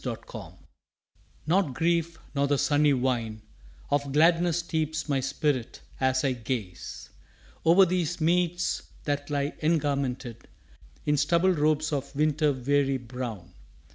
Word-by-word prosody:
UNBURTHENED - - -6 0.9
Not 165 -4 +1
grief 170 +1 +1 0.2
nor 140 0 +1
the 145 0 +2
sunny 145 +1 +3
wine 120 -5 -1 0.5
Of 140 -1 +1
gladness 165 +2 +4
steeps 160 -3 -2
my 140 -3 +1
spirit 135 -1 -1 0.2
as 130 0 +2
I 135 - +2
gaze 115 -7 -5 0.5
Over 175 +4 +6
these 175 -2 -1
meads 175 +2 +1 0.2
that 145 0 -2
lie 145 0 0
engarmented 140 -7 -1 0.6
In 150 0 +2
stubble 170 +6 +3
robes 155 -1 +1
of 140 -1 -3
winter 150 0 +2
weary 135 +1 +1
brown. 120 -7 -7
145 Hz, 120 wpm, -27 LUFS, 130-160 Hz, 0.9 s, Over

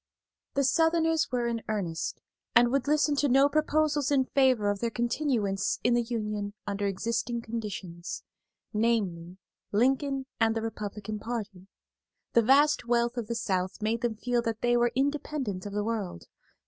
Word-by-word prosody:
The 280 - +2
Southerners 325 +2 +2
were 245 -1 0
in 235 -1 -1
earnest, 180 -6 -3 0.3
and 240 +1 +6
would 275 0 0
listen 300 0 +3
to 285 0 +2
no 270 +3 +6
proposals 305 -1 +1
in 275 -2 +3
favor 255 -7 +3
of 200 - -4
their 235 - 0
continuance 235 -5 0
in 240 - +3
the 240 - +3
Union 210 -3 -3
under 205 0 -1
existing 230 +4 -2
conditions; 200 -7 -5 0.5
namely, 195 -6 0 0.3
Lincoln 270 +4 +1
and 225 0 +3
the 225 - -2
Republican 210 -1 -5
party. 205 -5 -5 0.7
The 235 - +6
vast 275 +4 +4
wealth 235 0 +2
of 235 -4 -3
the 235 - -2
South 190 -5 -1
made 225 +2 -1
them 240 -3 0
feel 240 +2 0
that 225 -2 -3
they 240 0 +3
were 240 0 +3
independent 270 -8 -1
of 200 - -7
the 210 0 0
world. 210 - -3
235 Hz, 160 wpm, -28 LUFS, 210-265 Hz, 0.7 s, and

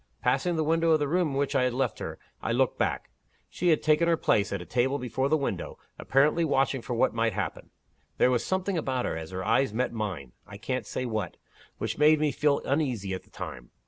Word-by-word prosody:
Passing 175 -2 +1
the 160 - +1
window 165 +2 +2
of 160 -1 +5
the 145 - 0
room 175 +3 +2
in 140 - -4
which 140 0 0
I - - +3
had 125 -1 +1
left 130 -3 -1
her, - - -5 0.2
I - - -1
looked - - +1
back. - - -1 0.4
She 180 - -2
had 160 -3 +3
taken 155 +2 +3
her 165 -1 +3
place, 100 -8 +2
at 100 - -2
a 90 - -8
table 130 +6 +1
before 130 +1 -1
the 155 - +3
window, 140 - -3 0.2
apparently 150 +5 +3
watching 135 -3 +1
for 120 - -4
what 115 - +2
might 115 -1 +1
happen. 95 -3 -4 0.5
There 125 - +4
was 125 - +1
something 190 -1 -1
about 130 -4 -1
her, - - -2
as 80 -1 -6
her 95 0 -5
eyes 115 +1 +2
met 125 0 0
mine 95 - -4 0.2
(I 100 - -9
can't 130 +5 -3
say 130 - -3
what), 110 -7 -3 0.4
which - - -3
made 150 +1 +6
me 150 -1 +2
feel 145 0 +1
uneasy 125 -9 -1
at 95 - -4
the - - -26
time. - - -8
130 Hz, 235 wpm, -28 LUFS, 110-155 Hz, 0.5 s, made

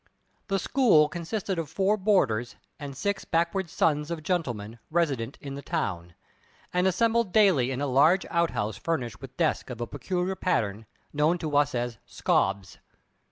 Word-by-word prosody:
The 195 - +1
school 195 - +4
consisted 180 +3 -3
of 160 -4 -4
four 195 +5 +2
boarders 160 - +1 0.2
and 140 -2 -7
six 200 +5 -1
backward 170 +2 0
sons 150 -1 +1
of 165 -2 -4
gentlemen 120 - -2
resident 140 -7 0
in 140 -1 -7
the 140 - -6
town, 90 - -3 0.6
and 180 +1 +2
assembled 230 +2 +2
daily 180 - +4
in 135 +1 -3
a - - +1
large 145 +8 +4
outhouse 110 - 0
furnished 125 -5 -3
with 135 -1 -11
desks 160 -4 0
of 125 -2 -6
a 120 - -2
peculiar 180 - -2
pattern, 110 - -1 0.3
known 150 +4 +2
to 155 -4 -3
us 145 -2 +3
as 120 -3 -3
"scobs." 100 -1 0
155 Hz, 160 wpm, -27 LUFS, 125-180 Hz, 0.6 s, school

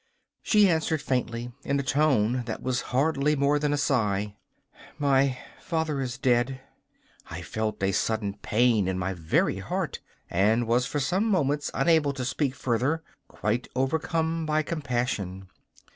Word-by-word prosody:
She 210 -2 +5
answered 160 -2 +1
faintly, 120 -3 -2
in 140 0 0
a - - -1
tone 130 -4 +2
that 115 - -5
was 130 -1 0
hardly 145 +2 +2
more 145 +1 +2
than 145 0 0
a 145 - +1
sigh: 105 -7 0 0.6
'My 135 -2 +2 0.2
father 160 -4 -1
is 125 -2 -3
dead.' 125 +1 +1 0.7
I 85 +2 -6
felt 110 +2 -3
a 95 - +3
sudden 105 +1 0
pain 110 -3 +2
in 95 -1 -1
my 95 +1 -2
very 80 -3 0
heart, - - -3 0.3
and 110 +6 +2
was 120 +2 +2
for 145 - -2
some 180 +10 +1
moments 150 -9 +1
unable 150 0 +3
to 130 -2 -4
speak 135 +2 -1
further, 130 +6 0 0.2
quite 115 +3 -2
overcome 160 +4 0
by 155 0 +1
compassion. 120 - -3
130 Hz, 145 wpm, -27 LUFS, 115-150 Hz, 0.7 s, She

